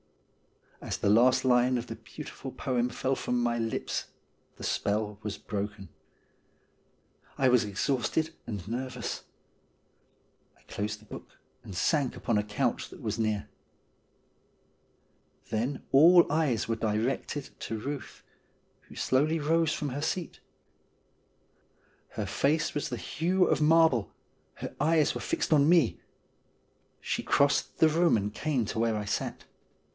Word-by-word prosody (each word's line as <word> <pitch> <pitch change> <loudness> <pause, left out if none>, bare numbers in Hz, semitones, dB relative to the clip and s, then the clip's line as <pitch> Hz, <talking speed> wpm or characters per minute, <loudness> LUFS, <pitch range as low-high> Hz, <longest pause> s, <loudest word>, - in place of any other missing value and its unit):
As - - -3
the 100 - +2
last 125 +4 +4
line 125 0 +4
of 120 - -4
the 115 - -7
beautiful 135 +4 -9
poem 125 -2 -1
fell 130 +2 -1
from 125 -1 -1
my 120 -1 0
lips 115 -1 -2 0.5
the - - -11
spell 105 0 -1
was 105 -2 -4
broken. 100 -1 -5 1.5
I 130 - +4
was 125 -2 +4
exhausted 135 +9 -1
and 100 -5 -5
nervous. 125 +1 -4 1.3
I - - -27
closed 105 +1 -4
the 110 - -19
book, - - -11 0.3
and 95 - -9
sank 140 - +1
upon 110 -3 0
a - - 0
couch 105 0 -1
that - - -12
was - - -3
near. 110 -2 0 2.0
Then 120 +5 -1
all 170 +5 +8
eyes 145 -8 +1
were 115 - 0
directed 115 +6 -2
to 115 - -4
Euth, 140 +4 -6 0.7
who - - -12
slowly 150 +5 +2
rose 160 +1 +2
from 150 - -2
her 140 +3 -4
seat. 170 +2 -3 1.7
Her - - -3
face 155 +2 +1
was 145 - -2
of - - -4
the - - -3
hue 180 +3 +1
of 145 - +1
marble; 155 -8 +4 0.4
her - - -7
eyes 155 0 +3
were - - -5
fixed - - 0
on 145 0 +5
me; 170 -9 +3 1.0
she - - -2
crossed 140 0 +2
the 160 - +6
room 165 -3 +3
and 105 0 -3
came 140 -7 -1
to 110 - -4
where 115 -1 +1
I 105 - -3
sat. 105 - -3
125 Hz, 140 wpm, -29 LUFS, 110-150 Hz, 2.0 s, all